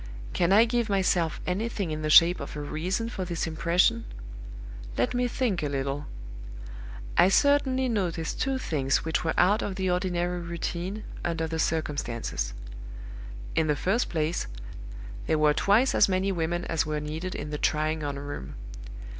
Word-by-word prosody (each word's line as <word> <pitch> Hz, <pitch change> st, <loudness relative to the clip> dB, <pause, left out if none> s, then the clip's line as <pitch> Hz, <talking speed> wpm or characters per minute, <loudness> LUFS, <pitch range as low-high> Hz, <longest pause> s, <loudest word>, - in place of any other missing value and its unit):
"Can 175 Hz, +1 st, +2 dB
I 215 Hz, +4 st, +7 dB
give 235 Hz, -1 st, 0 dB
myself 180 Hz, -4 st, +1 dB
anything 200 Hz, -1 st, -2 dB
in 155 Hz, 0 st, -3 dB
the 155 Hz, -, -1 dB
shape 170 Hz, +3 st, +7 dB
of -, -, -7 dB
a -, -, -4 dB
reason 175 Hz, +9 st, -2 dB
for 210 Hz, -5 st, -4 dB
this 175 Hz, -2 st, -2 dB
impression? 170 Hz, +8 st, +2 dB, 0.9 s
Let -, -, +1 dB
me 245 Hz, 0 st, +1 dB
think 230 Hz, -7 st, -1 dB
a 150 Hz, -, -1 dB
little. 140 Hz, +1 st, -3 dB, 1.1 s
"I 185 Hz, -, +7 dB
certainly 265 Hz, +2 st, +3 dB
noticed 180 Hz, -8 st, -2 dB
two 270 Hz, 0 st, 0 dB
things 140 Hz, -, 0 dB
which 160 Hz, -, 0 dB
were 165 Hz, -, -1 dB
out 205 Hz, +4 st, +4 dB
of 195 Hz, -, -3 dB
the 190 Hz, -1 st, 0 dB
ordinary 180 Hz, -1 st, -1 dB
routine, 170 Hz, +4 st, -4 dB, 0.2 s
under 165 Hz, -1 st, -1 dB
the 160 Hz, 0 st, -3 dB
circumstances. 120 Hz, -, -2 dB, 1.0 s
In 160 Hz, -, +1 dB
the 150 Hz, -, +2 dB
first 200 Hz, +10 st, 0 dB
place, 160 Hz, 0 st, -1 dB, 0.8 s
there 155 Hz, -, +2 dB
were 150 Hz, -1 st, +4 dB
twice 215 Hz, -, +3 dB
as -, -, +5 dB
many 190 Hz, +1 st, +1 dB
women 175 Hz, 0 st, -1 dB
as 165 Hz, -, 0 dB
were 150 Hz, 0 st, -2 dB
needed 160 Hz, +5 st, -5 dB
in 150 Hz, +1 st, -5 dB
the 150 Hz, -, -3 dB
trying 155 Hz, +1 st, 0 dB
on 140 Hz, -1 st, -3 dB
room. 140 Hz, -, -7 dB
170 Hz, 165 wpm, -27 LUFS, 155-195 Hz, 1.1 s, I